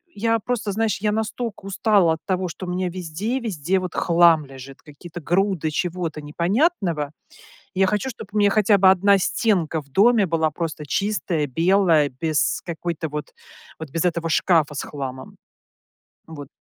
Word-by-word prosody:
я 225 +2 +1
просто, 220 -2 -2
знаешь, 220 -2 0
я 210 -1 +1
настолько 220 -1 -4
устала 195 -4 +2
от 160 - -5
того, 185 -1 -1
что 185 +3 -7
у - - -4
меня 180 0 -1
везде-везде, 185 - -2
вот, 185 -1 -6
хлам 170 -3 +4
лежит, 135 0 -12
какие-то 165 +4 -11
груды 180 -2 0
чего-то 165 -2 -3
непонятного. 170 - 0 0.6
Я 190 0 +3
хочу, 210 +6 -1
чтоб 220 -3 -10
у - - -6
мя 205 -1 +4
хотя 210 -1 +4
бы 190 0 +6
одна 200 +1 +4
стенка 180 -6 0
в 140 - -25
доме 210 - +4
была 160 -1 0
просто 155 -1 -5
чистая, 175 -2 -1
белая, 165 0 +3
без 155 -2 0
какой-то 170 -1 -4
вот 150 0 -6 0.5
вот 160 -2 -7
без 165 +3 -2
этого 170 -1 -1
шкафа 160 -3 +2
с - - -3
хламом. 130 -2 -7 0.9
Вот. 145 -4 -9
175 Hz, 160 wpm, -22 LUFS, 155-200 Hz, 0.9 s, бы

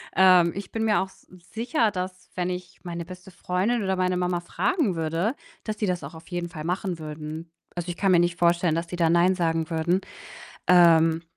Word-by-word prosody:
Ähm, 180 -2 +6
ich 200 -1 -7
bin 225 - -1
mir 215 - +3
auch 190 - -2
s - - -21 0.3
sicher, 230 +1 +1
dass, 185 -1 -6
wenn 180 0 -1
ich 180 0 -6
meine 170 -1 -5
beste 180 +2 -11
Freundin 185 +7 -1
oder 190 -1 0
meine 185 0 +1
Mama 180 -1 0
fragen 265 - 0
würde, 165 - -1 0.3
dass 215 - -2
die 210 - -1
das 180 -1 -1
auch - - -8
auf 160 0 -13
jeden 175 -1 -3
Fall 155 -2 -7
machen 180 0 -2
würden. 155 +1 -7 0.3
Also, 175 0 -4
ich 175 - -3
kann 195 -1 +2
mir 175 - +6
nicht 175 0 +1
vorstellen, 170 -1 +3
dass 165 +1 -2
die 175 - -6
da 165 -2 +3
nein 175 +3 +4
sagen 165 -2 0
würden. 170 +2 +1 0.7
Ähm, 165 -2 +6
180 Hz, 210 wpm, -25 LUFS, 170-185 Hz, 0.7 s, Ähm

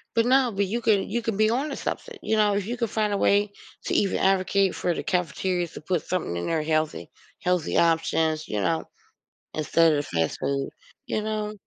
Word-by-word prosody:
But 230 0 +3
no, 260 0 +4
but 200 0 0
you 225 +5 -2
can 215 -4 +2
you 235 +3 -1
can 225 -3 -2
be 215 +1 +3
on 265 +6 0
to 275 - -4
something. 475 -3 -5
You 220 - 0
know, 210 -1 +3
if 200 -1 -1
you 240 +3 -3
can 235 -2 -1
find 215 -1 0
a - - +1
way 205 +1 +2 0.3
to - - -1
even 200 - +2
advocate 195 0 +2
for 175 - 0
the - - -3
cafeterias 180 0 -1
to - - -8
put 170 +1 -1
something 180 - -2
in 85 - -3
there 160 -2 0
healthy, 155 0 -1 0.3
healthy 180 -3 +1
options, 160 -1 +1
you 105 -1 -2
know, 80 -4 0 0.7
instead 160 +1 +3
of 145 -1 0
fast 80 -2 -1
food, 140 0 -1 0.4
you 215 - -1
know? 215 -1 -2
190 Hz, 210 wpm, -25 LUFS, 160-215 Hz, 0.7 s, no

